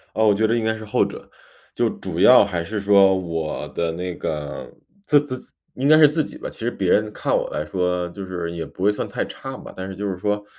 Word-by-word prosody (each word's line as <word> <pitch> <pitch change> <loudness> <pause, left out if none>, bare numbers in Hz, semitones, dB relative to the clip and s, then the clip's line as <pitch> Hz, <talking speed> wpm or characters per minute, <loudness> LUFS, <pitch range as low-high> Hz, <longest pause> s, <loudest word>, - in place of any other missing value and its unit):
啊， 110 - +2
我 105 -2 +5
觉 110 +2 +1
得 115 +2 +2
应 115 - 0
该 110 0 +1
是 110 0 -8
后 105 - +2
者。 - - -9 0.5
就 - - +2
主 - - -6
要 - - +8
还 90 -4 -2
是 105 +5 -4
说 100 -1 +5
我 80 -4 -3
的 85 -1 -2
那 90 +1 -4
个 75 -2 -5 0.4
自 145 - +6
自 145 -3 -4 0.4
应 135 +2 -1
该 155 - +7
是 155 -1 +8
自 155 +2 +1
己 - - -9
吧， - - -6
其 - - -9
实 115 - -1
别 95 -6 -1
人 105 +1 +2
看 - - -1
我 - - -1
来 75 - -3
说 90 +1 -1
就 100 +2 -8
是 90 -3 -4
也 85 -1 -4
不 90 +3 -8
会 105 - +5
算 105 - -3
太 - - -2
差 135 -1 -8
吧， - - -11
但 95 0 -6
是 95 - -7
就 100 +2 -3
是 95 - -2
说， 105 +1 -1
100 Hz, 280 characters per minute, -22 LUFS, 90-110 Hz, 0.5 s, 要